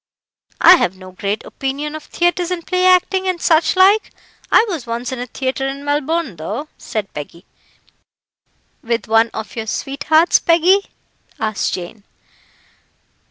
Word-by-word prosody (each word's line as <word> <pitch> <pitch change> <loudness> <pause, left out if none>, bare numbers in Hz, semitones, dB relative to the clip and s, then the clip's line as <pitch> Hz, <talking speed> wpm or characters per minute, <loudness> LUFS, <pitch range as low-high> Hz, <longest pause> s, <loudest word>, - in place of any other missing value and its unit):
"I 360 +1 +9
have 185 - -1
no 185 0 -12
great 200 +3 -4
opinion 280 +3 -4
of 310 -1 -8
theatres 350 0 0
and 355 -2 -4
play 365 0 +1
acting, 370 +1 +3
and 365 -2 -1
such 320 +2 +2
like. 390 +3 +4 0.4
I 450 - +6
was 330 - -5
once 235 +2 -4
in 260 - -5
a 245 - -5
theatre 265 +2 -3
in 275 +1 -6
Melbourne, 290 - -1
though," 215 - -5
said 210 -3 -5
Peggy. 160 +5 -9 1.4
"With 235 +1 -2
one 225 +1 +3
of 220 -1 -7
your 225 -1 -5
sweethearts, 310 +8 +2
Peggy?" 355 +4 +3 0.5
asked 215 -2 -1
Jane. 185 +4 -9
275 Hz, 145 wpm, -18 LUFS, 220-345 Hz, 1.4 s, I